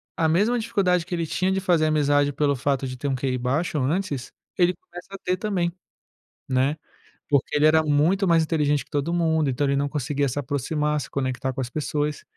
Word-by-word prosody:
a 160 - +1
mesma 210 +10 +2
dificuldade 195 -7 +1
que 180 0 -3
ele 170 -1 -1
tinha 185 +4 0
de 190 - +1
fazer 175 -4 +2
amizade 145 -1 +2
pelo 140 0 +1
fato 135 0 -1
de 130 0 -6
ter 145 - -3
um 135 - 0
QI 130 0 -1
baixo 140 +7 -1
antes, 145 -1 -2 0.3
ele 180 0 +3
começa 175 +1 -12
a - - -6
ter 185 -1 -1
também, 185 -4 -1 0.8
né, 135 +3 +1 0.5
porque 140 -1 +1
ele 150 +1 +4
era 160 +1 +5
muito 160 +6 +2
mais 165 -2 +4
inteligente 150 -3 +1
que - - -33
todo 145 +4 -1
mundo, 160 -3 +1
então 135 +3 0
ele 140 - +1
não 140 +1 0
conseguia 145 0 -1
se 130 - -4
aproximar, 150 +2 -1
se - - -7
conectar 130 -1 -2
com 130 - -4
as 125 - -4
pessoas 150 +1 -2
150 Hz, 210 wpm, -24 LUFS, 140-170 Hz, 0.8 s, era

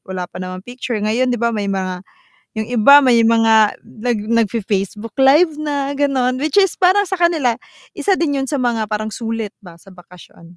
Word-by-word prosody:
wala 185 -1 -4
pa - - -14
naman 185 0 -6
picture 245 -1 -5
ngayon 225 +5 0
'di - - -1
ba 235 0 0
may 205 -1 -3
mga 185 -1 -3 0.6
yung 220 +2 -4
iba 280 +5 +6
may 240 -3 +4
mga 225 -2 +3
nag 230 -1 -4 0.3
nagfi-Facebook 210 0 -4
live 295 +4 +4
na, 285 -2 -2
gano'n 260 -3 0
which 295 +1 -2
is 385 - +2
para 375 +2 +4
sa 380 -1 -4
kanila 310 -9 +1 0.4
isa 400 - +1
din 295 -5 -1
yun 270 - -3
sa 290 - -2
mga 230 -3 -1
parang 215 +1 -3
sulit 225 -1 -4
ba 180 -4 -14
sa 170 +3 -18
bakasyon. 180 -1 -17
235 Hz, 185 wpm, -18 LUFS, 210-280 Hz, 0.6 s, iba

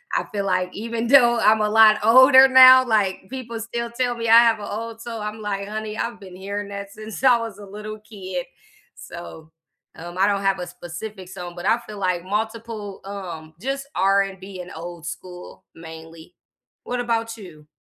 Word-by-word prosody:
I - - 0
feel 200 -1 -1
like 185 -1 0
even 230 +2 -4
though 240 -3 +5
I'm 215 0 +4
a 210 - +1
lot 215 0 +6
older 260 +3 +8
now, 260 0 +9
like, 205 -5 +1
people 235 -3 -6
still 235 +1 -5
tell 245 0 -1
me 230 - -3
I 230 +1 +9
have 230 -2 +2
a 205 - -7
old 225 +2 -6
soul, 230 -2 -6
I'm 210 +1 -5
like, 200 -1 -4
"Honey, 215 0 -5
I've 235 -1 -4
been 185 -3 -12
hearing 200 +2 -6
that 200 0 -7
since 215 +3 -9
I 255 -2 +6
was 225 -3 -7
a 205 - -10
little 210 +2 -8
kid." 190 -4 -7 0.5
So, 160 -2 -11 0.4
um, 175 +2 -9
I 195 - +3
don't 200 -1 0
have 195 0 +1
a 180 - -4
specific 180 +3 -9
song, 180 -2 -8
but 175 - -8
I 225 - +4
feel 210 -1 -9
like 180 -2 -1
multiple, 215 0 -5
um, 175 -6 -8
just 275 +3 -4
R&B 195 -1 0
and 180 - -11
old 170 0 -9
school, 180 +2 -10
mainly. 160 0 -12 0.5
What 245 0 -3
about 230 -1 -2
you? 160 -8 -13
210 Hz, 190 wpm, -22 LUFS, 185-230 Hz, 0.5 s, now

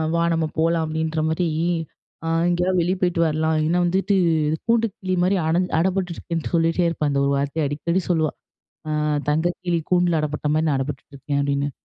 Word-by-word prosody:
"வா 170 - +2
நம்ம 165 -1 +1
போலாம்." 165 0 +2
அப்டின்ற 160 0 -1
மாரி 170 +2 0 0.8
அ - - -2 0.2
"எங்கேயாவது 180 +1 +1
வெளியே 180 +3 0
போய்ட்டு 175 -2 +1
வரலாம்." 160 0 +1
இல்லனா 165 +3 +1
வந்துட்டு 190 +3 +1 0.5
கூண்டு 230 0 +3
கிளி 185 -1 -1
மாரி 185 +2 +2
அட 160 - +2 0.2
அடப்பட்டுருக்கேன்னு 175 -3 -2
சொல்லிகிட்டே 165 +1 +2
இருப்பா. 150 -3 -1
இந்த 140 - +1
1 140 - +1
வார்த்தைய 145 +2 -1
அடிக்கடி 170 +6 -1
சொல்லுவா. 160 -3 +2 0.6
"அ - - -2 0.4
தங்க 165 +4 +1
கிளி 175 -2 0
கூண்டுல 175 -3 +3
அடப்பட்ட 150 0 -3
மாரி 155 +1 +1
நான் 140 - +2
அடப்பட்டுட்டு 140 +1 -5
இருக்கேன்." 140 +1 -2
அப்டின்னு. 140 0 0
165 Hz, 170 wpm, -22 LUFS, 155-175 Hz, 0.8 s, கூண்டு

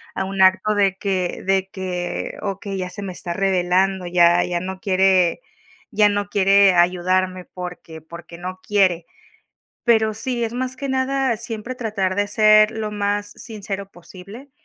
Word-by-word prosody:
A - - -1
un 195 0 -3
acto 190 +3 +4
de 195 -2 +1
que 190 -3 -2
de 190 0 +1
que, 180 -2 -4
okey, 195 0 -4
ya 180 -1 -3
se 200 +3 -8
me 190 -2 -5
está 175 -1 -5
revelando, 190 0 +1
ya 175 0 +4
ya 175 -1 -2
no 185 +1 -6
quiere 190 0 +2 0.8
ya 210 -1 +4
no 205 0 -2
quiere 195 -1 +4
ayudarme 185 +1 +1
porque 180 -3 -9
porque 170 +1 -11
no 185 +1 -6
quiere. 185 -5 +2 0.8
Pero 220 -2 +3
sí, 235 +2 -3
es 230 0 -3
más 255 +1 -3
que 275 +1 -5
nada, 265 -1 0
siempre 230 +2 -6
tratar 205 -6 -2
de 205 +1 0
ser 215 0 +5
lo 220 -2 -4
más 205 0 -2
sincero 200 -3 -7
posible. 195 +9 -13
195 Hz, 160 wpm, -21 LUFS, 185-215 Hz, 0.8 s, ser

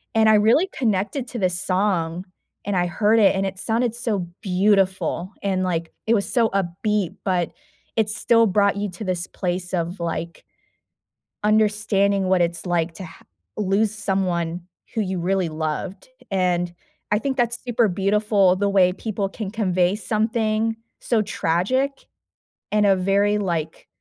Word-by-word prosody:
and 220 -1 +5
I 215 - +6
really 225 - +4
connected 220 +2 -1
to 240 - -5
this 180 -2 0
song, 185 -3 0 0.4
and 205 -1 -1
I 175 -1 +2
heard 215 +5 +2
it, 200 -3 +5
and 195 0 0
it 190 -1 -4
sounded 230 +2 0
so 215 -7 -2
beautiful, 190 -1 +1
and, 190 -2 0
like, 170 -3 -2 0.2
it 225 - +4
was 200 - -1
so 230 -3 +3
upbeat, 195 +1 -1
but 180 -3 0 0.5
it 220 -2 +2
still 230 +2 +3
brought 200 +1 +2
you 205 0 -2
to 180 +5 -8
this 180 -1 -2
place 180 0 -3
of, 175 +1 -2
like 170 +1 -4 1.0
understanding 210 -2 +2
what 185 -1 +2
it's 170 +1 -1
like 170 -1 0
to 190 - -8
ha 165 - -13 0.4
lose 210 +1 +1
someone 180 -4 -1 0.3
who 225 - 0
you 190 -3 -2
really 185 0 0
loved, 155 +6 -4 0.2
and 180 -2 0 0.4
I 210 - +3
think 265 +4 -2
that's 240 -1 0
super 240 -2 +2
beautiful 200 0 +2
the 200 +1 +1
way 190 -2 +4
people 200 +1 -3
can 195 0 -6
convey 185 -4 +1
something 220 0 0 0.2
so 230 -3 +1
tragic 255 +11 -1 0.7
in 210 0 +3
a 195 -1 +5
very, 200 +2 +2
like, 170 -5 -3
195 Hz, 155 wpm, -22 LUFS, 180-215 Hz, 1.0 s, I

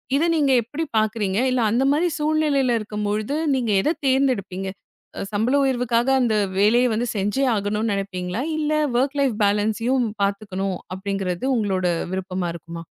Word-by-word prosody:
இதை 315 +5 +2
நீங்க 290 -4 +2
எப்படி 285 +8 -4
பார்க்குறீங்க? 215 -2 0
இல்ல 255 -1 +1
அந்த 240 +4 +2
மாதிரிச் 330 +1 0
சூழ்நிலையில 300 -5 +2
இருக்கும்போது 210 +3 -2 0.2
நீங்க 240 -4 0
எத 310 - +1
தேர்ந்தெடுப்பீங்க? 230 -9 0 0.5
அ, - - -4
சம்பள 225 +7 +1
உயர்வுக்காக 245 -2 +1
அந்த 230 -3 +2 0.2
வேலைய 235 +5 +4
வந்து 235 +3 -1
செஞ்சு 210 +7 0
ஆகணும்னு 210 +2 -1
நினைப்பீங்களா? 190 +1 -3 0.2
இல்ல 305 0 0 0.2
வொர்க் 270 +4 +1
லைஃப் 265 -5 +1
பேலன்ஸ்யும் 220 +5 +1 0.2
பாத்துக்கணும் 195 -2 -2 0.2
அப்படிங்கறது 190 0 -3
உங்களோட 195 -5 0 0.3
விருப்பமா 185 -2 -3
இருக்குமா? 170 0 -8
220 Hz, 140 wpm, -22 LUFS, 195-260 Hz, 0.5 s, வேலைய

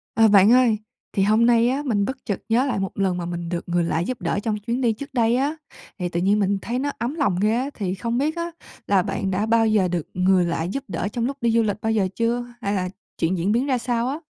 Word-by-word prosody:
À, 225 0 +6
bạn 205 0 +6
ơi 245 -3 +5 0.4
thì 195 - +2
hôm 215 +3 +4
nay 235 0 +4
á 275 +3 -1
mình 205 -6 +1
bất 265 +3 -4
chợt 200 - -2
nhớ 240 +4 +3
lại 255 -7 -1
một 195 -1 -2
lần 190 -2 +1
mà 175 - -3
mình 170 -1 -4
được 175 0 -4
người 175 0 +2
lạ 165 -1 0
giúp 225 +7 -3
đỡ 175 +3 -1
trong 215 -2 -1
chuyến 235 +5 -3
đi 235 -3 +2
trước 275 +5 -9
đây 235 -2 +2
á, 280 +5 0 0.4
thì 180 -1 -2
tự 170 - -2
nhiên 200 +4 +2
mình 200 0 +1
thấy 240 +2 -2
nó 285 +2 -1
ấm 245 +6 -3
lòng 205 - +1
ghê 215 +2 +3
á, 260 +4 -1
thì 190 -4 -3
không 230 +5 -2
biết 300 +5 0
á 340 0 -3 0.4
là 200 -2 +4
bạn 195 0 -2
đã 195 +3 0
bao 225 0 +3
giờ 210 -4 +3
được 175 -3 -3
người 185 0 +3
lạ 165 -1 -1
giúp 230 +11 -3
đỡ 185 0 -3
trong 235 -1 -1
lúc 275 +2 -3
đi 235 - +2
du 230 0 +3
lịch 205 -2 -1
bao 220 - 0
giờ 210 -4 +2
chưa? 235 +1 0 0.2
Hay 200 -2 -1
là 185 -2 -1 0.3
chuyện 175 +3 0
diễn 180 +4 0
biến 240 +5 +1
ra 260 -2 +2
sao 235 0 -1
á? 285 +3 -3
220 Hz, 280 wpm, -23 LUFS, 190-240 Hz, 0.4 s, À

